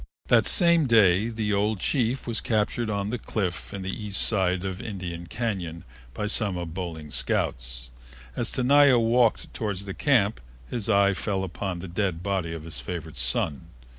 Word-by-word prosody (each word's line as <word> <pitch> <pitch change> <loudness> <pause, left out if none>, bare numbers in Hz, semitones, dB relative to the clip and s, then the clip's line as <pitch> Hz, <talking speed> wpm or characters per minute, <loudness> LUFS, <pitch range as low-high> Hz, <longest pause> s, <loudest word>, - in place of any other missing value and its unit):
That - - +5
same 170 -5 +5
day 105 -3 +4
the 110 -2 -2
old 105 +1 +1
chief 125 +3 0
was 115 -2 -2
captured 110 +1 0
on 100 0 -2
the 125 - -3
cliff 95 -6 -3
on 100 -1 -6
the 95 - -3
east 105 -2 -2
side 95 -3 +2
of 95 -1 -4
Indian 90 -7 -6
Cañon 95 -8 -4 0.3
by 105 - -2
some 105 -3 0
of 85 -2 -5
Boling's 80 -5 -6
scouts. - - -2 0.4
As - - -1
Tenaya 140 +1 +5
walked 115 0 +2
toward 105 -3 -3
the 100 -1 -6
camp 115 -7 +2 0.3
his 115 -3 -2
eye 100 -1 +4
fell 95 0 -2
upon 95 0 -4
the 95 - -7
dead 90 -1 -2
body 95 -4 -1
of 80 -2 -6
his 80 -1 -5
favorite 80 -3 -6
son. 65 +3 0
100 Hz, 170 wpm, -26 LUFS, 90-110 Hz, 0.4 s, That